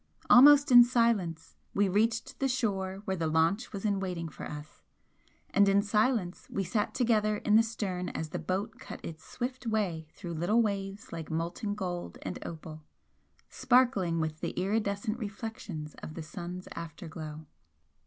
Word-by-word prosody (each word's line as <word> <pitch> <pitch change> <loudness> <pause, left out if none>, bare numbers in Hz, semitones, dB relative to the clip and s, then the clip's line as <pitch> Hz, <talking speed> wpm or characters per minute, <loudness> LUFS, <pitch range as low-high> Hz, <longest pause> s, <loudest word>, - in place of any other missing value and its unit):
Almost 285 +3 +8
in 245 -1 +11
silence 230 -9 0 0.2
we 205 0 +3
reached 220 +4 0
the 270 - +2
shore 200 -6 -1
where 190 - -1
the 165 -3 -1
launch 165 +9 +1
was 200 0 -5
in 200 -2 +1
waiting 180 -4 -3
for - - -8
us, 150 0 -9 0.7
and 200 0 +5
in 200 +1 +4
silence 210 -3 0
we 195 - -1
sat 205 +4 -1
together 215 -4 +2
in 210 0 +2
the 225 - +8
stern 195 -6 -3
as 160 - -4
the - - -4
boat 200 +4 -3
cut - - -8
its 160 -1 -8
swift 250 0 -5
way 190 -8 -1
through 170 +1 -7
little 200 +9 +2
waves 200 -2 -4
like 165 -2 -6
molten 170 +6 -2
gold 180 -4 -4
and - - -5
opal, 155 -1 -8 0.7
sparkling 225 -10 +2
with 155 -1 -2
the - - -3
iridescent 205 +3 -1
reflections 200 -7 -6
of 155 - -8
the 165 - -5
sun's 180 +2 -7
after 170 +2 -7
glow. 155 -1 -7
195 Hz, 165 wpm, -30 LUFS, 170-220 Hz, 0.7 s, in